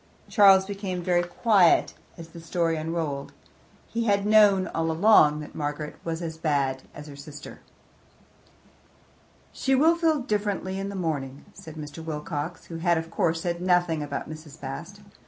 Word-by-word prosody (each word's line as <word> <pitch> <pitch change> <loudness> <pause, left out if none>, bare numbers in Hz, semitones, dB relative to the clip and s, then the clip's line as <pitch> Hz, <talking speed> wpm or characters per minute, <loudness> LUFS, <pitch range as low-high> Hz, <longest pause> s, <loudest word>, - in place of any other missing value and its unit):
Charles 195 -3 +6
became 195 -3 -4
very 175 -1 +2
quiet 180 +1 +3 0.2
as 165 -1 -10
the 170 - -11
story 165 0 -1
unrolled; 155 -3 -3 0.5
he 230 0 -2
had 200 -2 +2
known 205 -3 +5
all 165 0 -1
along 160 -4 +5
that 150 - -10
Margaret 150 0 -4
was 165 +1 -4
as 160 -1 -6
bad 140 -4 0
as 150 - -10
her 145 -2 -10
sister. 145 +1 -10 1.9
"She 270 0 +1
will 320 +5 +4
feel 325 -2 +2
differently 205 -4 -2
in 195 0 -4
the 200 - -6
morning," 145 -6 -4
said 160 -1 -11
Mr. 150 +1 -8
Wilcox, 150 +1 -5
who 165 - -7
had 170 0 +2
of 165 0 -5
course 165 -1 0
said 170 0 -3
nothing 175 -3 +2
about 145 - -4
Mrs. 155 -1 -10
Bast. 165 +9 -7
165 Hz, 155 wpm, -26 LUFS, 150-195 Hz, 1.9 s, Charles